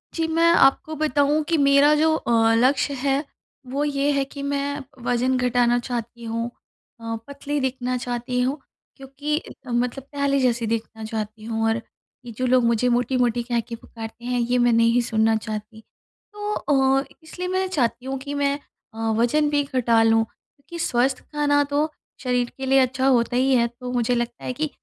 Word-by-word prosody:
जी, 330 - 0
मैं 330 +1 +1
आपको 310 0 +3
बताऊँ 300 0 +2
कि 330 - +3
मेरा 280 +1 +5
जो 315 +1 +3
अ, 225 -4 +2
लक्ष्य 265 +4 +2
है, 275 +2 0 0.4
वो 275 +3 -1
ये 285 0 +1
है 280 -1 +1
कि 280 +1 -9
मैं 285 0 -2 0.2
वज़न 250 +2 +1
घटाना 245 -1 +2
चाहती 235 -1 -5
हूँ 230 +1 -2 0.6
अ, 225 0 -3
पतली 285 +1 -3
दिखना 255 -1 -1
चाहती 245 +1 -3
हूँ, 270 +4 -1 0.4
क्योंकि 275 +3 -4
इतना 265 -4 -8
मतलब 245 +2 -1
पहले 280 -1 +1
जैसी 240 -2 +1
दिखना 225 0 -3
चाहती 215 0 -5
हूँ 225 -1 -2
और 225 +1 0 0.4
ये 235 - -7
जो 255 - -1
लोग 250 -1 +4
मुझे 235 +1 +2
मोटी-मोटी 245 -1 +1
कह 240 -1 0
के 230 +1 -6
पुकारते 225 +1 -10
हैं, 245 0 0
ये 245 +1 +1
मैं 240 -1 +4
नहीं 230 +1 +4
सुनना 220 -1 +2
चाहती। 220 0 -6 0.5
तो 415 0 -3
अ, 270 -4 +2
इ - - -20
इसलिए 360 +3 -6
मैं 375 +1 0
चाहती 255 -7 -1
हूँ 270 0 -3
कि 285 +1 -6
मैं 280 -1 +1 0.4
अ, - - -13 0.2
वज़न 295 +6 +2
भी 290 -1 +2
घटा 245 -4 +2
लूँ, 225 0 +4
क्योंकि 315 +8 -14
स्वस्थ 250 +1 +1
खाना 290 -1 +2
तो 295 +2 +1 0.3
शरीर 245 -1 0
के 265 - -4
लिए 270 +1 +4
अच्छा 260 +1 +1
होता 245 -2 +2
ही 265 +2 +3
है, 235 -1 +3
तो 250 +1 -8
मुझे 245 0 +1
लगता 240 0 -3
है 255 - -3
कि 305 +4 -2
255 Hz, 185 wpm, -23 LUFS, 235-280 Hz, 0.6 s, मेरा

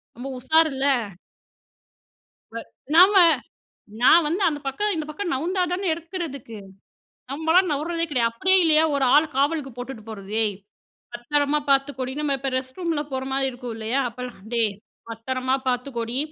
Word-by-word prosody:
நம்ப 245 +4 -7
உஷாருல்ல! 280 0 +2 1.7
வ 230 - -3 0.4
நாம 370 +4 +8 0.9
நான் 320 +6 +6
வந்து 350 +6 -1
அந்த 295 -2 -1
பக்கம் 410 +11 -1
இந்த 310 -2 -3
பக்கம் 345 +4 -4
நவுந்தா 355 +8 -1
தான 380 +2 -2
எடுக்கிறதுக்கு! 320 - -7 0.7
நம்பலாம் 320 +5 +2
நவுர்றதே 330 +4 -1
கெடையாது. 245 -5 +1
அப்படியே 375 +12 +2
இல்லையா, 315 -1 +4
ஒரு 275 -2 +1
ஆள் 310 +2 +5
காவலுக்கு 285 0 0
போட்டுட்டு 245 -3 -7
போறது. 200 -2 -9
"ஏய் 205 -3 -1 0.6
பத்திரமா 285 +4 0
பாத்துக்கோடி" 270 -2 +1
நம்ம 285 -2 0
இப்போ 270 +1 -2
ரெஸ்ட்ரூம்லாம் 295 +3 -4
போற 260 - -2
மாரி 270 0 +1
இருக்கும் 245 -1 -7
இல்லையா? 225 +5 -1
அப்போலாம் 245 -3 -9
"டேய் 225 -3 +2 0.4
பத்திரமா 255 +3 -2
பாத்துக்கோடி. 245 -1 -3
275 Hz, 135 wpm, -23 LUFS, 250-320 Hz, 1.7 s, நாம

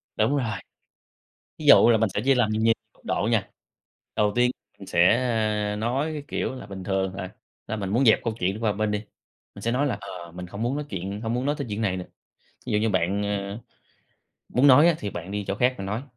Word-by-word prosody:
Đúng 145 - +2
rồi. 115 -5 -1 1.1
Ví 155 - -6
dụ 140 - +8
là 110 - +5
mình 110 -1 +2
sẽ - - 0
chia 135 0 +5
làm 120 -4 +2
nhiều 110 +1 +3 0.2
cấp - - -28
độ - - 0
nha. - - +1 0.7
Đầu 105 -1 +2
tiên 125 0 +4 0.3
mình 95 - -10
sẽ, 90 +4 +4 0.6
a, 105 - -3
nói 130 +8 -1
cái 150 - -5
kiểu - - -2
là 125 - -9
bình 95 -2 -8
thường, 95 -1 -1
à, 95 -1 -6 0.3
là 110 - -3
mình 100 -2 -3
muốn 125 +6 +2
dẹp 110 - +6
câu 115 -2 -1
chuyện 95 +4 -1
qua 110 -2 +1
một 100 - -9
bên 110 -1 +1
đi, 105 - 0 0.6
mình 100 - -11
sẽ 115 - 0
nói 135 +4 +1
là 120 -7 -1
"Ờ, 90 -4 -9
mình 90 0 -7
hông 100 +5 -6
muốn 120 +3 0
nói 150 0 -3
chuyện 100 +2 -4
hông 115 +1 -2
muốn 125 +3 -1
nói 145 - +1
tới 140 - -3
chuyện 105 +2 -3
này 95 -3 0
nữa. 90 - -5 0.6
Ví - - -4
dụ - - +4
như 110 - +1
bạn, 95 +2 0
ơ, 100 +1 -3 0.9
muốn 130 +3 +3
nói 145 +5 +8
á 170 - +4
thì 100 - -4
bạn 85 +2 -7
đi 100 0 -3
chỗ 100 - -1
khác 125 +4 +2
mà 95 - -4
nói." 105 +6 -3
105 Hz, 250 wpm, -25 LUFS, 100-125 Hz, 1.1 s, dụ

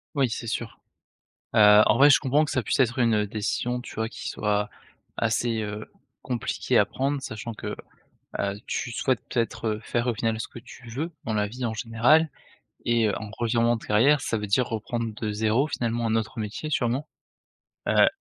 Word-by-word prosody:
Oui, 135 -3 +2
c'est 115 - -4
sûr. 110 - -4 0.8
Heu, 105 0 +8
en 105 - +4
vrai, 140 +2 +8
je - - +7
comprends 145 +2 +2
que - - -6
ça 130 - 0
puisse - - 0
être 125 0 +2
une 110 -3 +3
décision 115 +4 -2
tu - - -10
vois 110 0 -1
qui - - -7
soit 105 -1 0 0.5
assez, 115 0 0
heu, 105 0 -6 0.3
compliqué 125 -4 -1
à - - +5
prendre 140 +1 -2
sachant 110 -1 -6
que - - -5 0.6
bah, 100 -1 -1
tu 120 - -3
souhaites 130 +1 0
peut-être 115 -2 -1
faire 120 +2 -1
au 120 - +2
final 110 +1 -1
ce - - -4
que - - -13
tu 120 +1 -14
veux 150 +9 -3
dans 110 - -2
la 105 0 +1
vie 125 +4 -5
en 115 - -1
général 120 +9 +3 0.6
et 115 -2 +3
en 105 +1 -4
revirement 120 0 +2
de 115 - -8
carrière, 135 +8 +4
ça 115 - -1
veut 105 - -3
dire 120 +5 +2
reprendre 115 0 -3
de 110 -2 -2
zéro 110 +7 +1
finalement 120 -4 -1
un 110 - +1
autre 110 0 -2
métier 110 +8 -4
sûrement. 135 +1 0 0.8
Heu, - - +6
115 Hz, 190 wpm, -26 LUFS, 110-125 Hz, 0.8 s, Heu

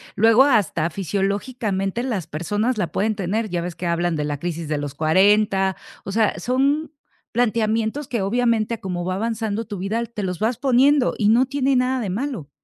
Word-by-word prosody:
luego 225 +4 +6
hasta 200 - +2
fisiológicamente 200 - -2
las 210 - -3
personas 205 +11 -1
la 175 -6 -2
pueden 215 +5 0
tener, 205 +3 -2
ya 175 -1 -2
ves 175 0 -5
que 180 - -6
hablan 170 0 0
de 150 - -1
la 145 -1 -3
crisis 170 0 -4
de 155 - 0
los 145 -1 -5
40, 190 +4 +3 0.3
o 195 - -4
sea, 215 +1 +1
son 280 +5 0 0.4
planteamientos 225 +3 0
que, 235 -5 -2
obviamente, 230 +2 +1
a - - -12
como 180 -2 -4
va 185 0 -1
avanzando 225 +1 -2
tu 210 -2 -6
vida, 205 +5 -2
te 220 -3 -6
los 180 -2 -3
vas 220 +2 0
poniendo 270 +1 +3
y 210 -2 +2
no 240 +4 +5
tiene 270 0 0
nada 255 +1 +1
de 215 -5 -3
malo, 205 - -4
210 Hz, 190 wpm, -22 LUFS, 185-240 Hz, 0.4 s, luego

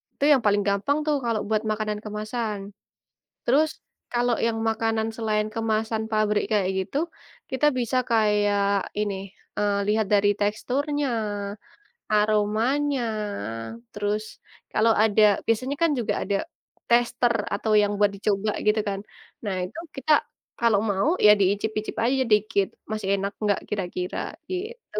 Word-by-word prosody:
Itu - - -4
yang 275 - +6
paling 205 0 +4
gampang 200 +9 +1
tuh 300 - +3
kalau 230 -2 +1
buat 215 0 +1
makanan 215 -1 -2
kemasan. 215 0 -3 0.9
Terus 300 +6 +3 0.4
kalau 240 0 +2
yang 225 -1 0
makanan 225 0 0
selain 215 -2 0
kemasan 220 0 0
pabrik 215 -1 +2
kayak 200 -3 +2
gitu, 190 +8 -3 0.5
kita 260 +3 +1
bisa 245 +1 0
kayak 205 -2 +2
ini, 210 -1 0 0.4
eee, 205 -1 +1
lihat 215 0 +2
dari 205 0 +4
teksturnya, 275 +8 0 1.1
aromanya, 220 +7 +2 0.9
terus 210 +1 -1 0.5
kalau 225 +1 +3
ada, 215 -1 +4 0.2
biasanya 255 +5 +1
kan 335 - +4
juga 230 - 0
ada 200 0 0 0.5
tester 240 0 +3 0.2
atau 210 +2 -1
yang 205 - +1
buat 205 -1 +4
dicoba 205 +1 0 0.2
gitu 215 +1 +4
kan. 195 -1 -3 0.4
Nah, 200 -3 -2
itu 180 - -6 0.2
kita 270 +3 -1 0.5
kalau 230 -4 +4
mau 195 +5 +1 0.2
ya 210 - +10
diicip-icip 210 +2 0
aja 260 +3 +2
dikit 210 -2 +3 0.2
masih 215 -2 -3
enak 200 +1 -3
enggak 205 -2 +2
kira-kira 180 -2 -3 0.3
gitu. 425 +7 -5
215 Hz, 130 wpm, -25 LUFS, 205-235 Hz, 1.1 s, ya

